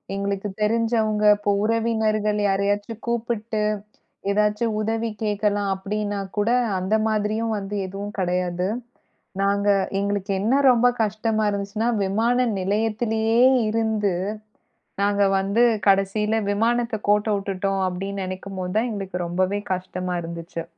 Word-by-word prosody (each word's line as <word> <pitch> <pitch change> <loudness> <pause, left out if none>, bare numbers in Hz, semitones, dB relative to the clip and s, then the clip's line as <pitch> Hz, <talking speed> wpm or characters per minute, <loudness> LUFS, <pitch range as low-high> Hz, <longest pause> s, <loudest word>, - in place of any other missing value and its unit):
எங்களுக்குத் 200 0 -3
தெரிஞ்சவங்க, 220 -1 +1
இப்ப 205 0 -2
உறவினர்கள் 220 -2 +1
யாரையாச்சும் 205 +3 -1
கூப்பிட்டு 230 -2 -1 0.7
எதாச்சும் 210 +2 +1
உதவி 225 +1 -1
கேட்கலாம் 205 -1 0
அப்டின்னா 205 +1 -3 0.2
கூட, 205 +2 +2 0.3
அந்த 190 +4 0
மாதிரியும் 215 +1 0
வந்து 200 0 -5
எதுவும் 200 +2 -6
கிடையாது. 180 0 0 0.7
நாங்க 200 +1 +1 0.3
எங்களுக்கு 200 0 -1
என்ன 225 +6 +2 0.2
ரொம்ப 245 0 +4 0.2
கஷ்டமா 215 +1 0
இருந்துச்சுன்னா, 200 +3 -2 0.2
விமான 235 +6 +2
நிலையத்திலேயே 220 +3 +1 0.3
இருந்து 220 -3 0 0.9
நாங்க 205 0 +2 0.2
வந்து 200 +4 +1 0.3
கடைசியில 195 +2 +2 0.2
விமானத்த 230 +2 0
கோட்ட 210 +1 +3
வுட்டுட்டோம், 195 0 -2
அப்டின்னு 195 +2 -4
நெனைக்கும்போது 185 0 -5
தான் 235 +3 +1
எங்களுக்கு 190 -4 -4
ரொம்பவே 185 +4 0
கஷ்டமா 185 0 -4
இருந்துச்சு. 170 0 -6
205 Hz, 110 wpm, -23 LUFS, 195-220 Hz, 0.9 s, ரொம்ப